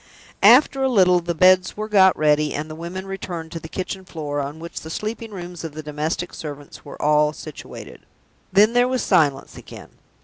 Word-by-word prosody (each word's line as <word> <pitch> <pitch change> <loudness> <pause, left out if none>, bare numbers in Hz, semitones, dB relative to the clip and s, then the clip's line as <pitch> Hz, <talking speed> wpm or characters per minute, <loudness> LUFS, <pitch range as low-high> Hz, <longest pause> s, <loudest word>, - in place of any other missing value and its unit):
After 255 +6 +6
a 265 - +2
little, 185 -6 +4
the 170 0 -4
beds 185 +3 +4
were 215 0 -4
got 190 -3 +5
ready 150 -1 +2
and 150 +1 -4
the 155 - -8
women 175 +4 -7
returned 175 -4 -6
to 165 - -5
the 160 - -10
kitchen 190 +1 -5
floor, 150 -5 -5
on 145 +2 -5
which 170 +1 -8
the 160 - -9
sleeping 220 +6 -5
rooms 175 -4 -8
of 160 -2 -6
the 155 - -7
domestic 150 +4 -3
servants 145 -2 -9
were - - -11
all 150 0 +2
situated. 155 -1 -10 0.5
Then 210 +4 +5
there 245 0 +3
was 255 0 -1
silence 140 -3 +1
again. - - -12
170 Hz, 195 wpm, -22 LUFS, 150-195 Hz, 0.5 s, After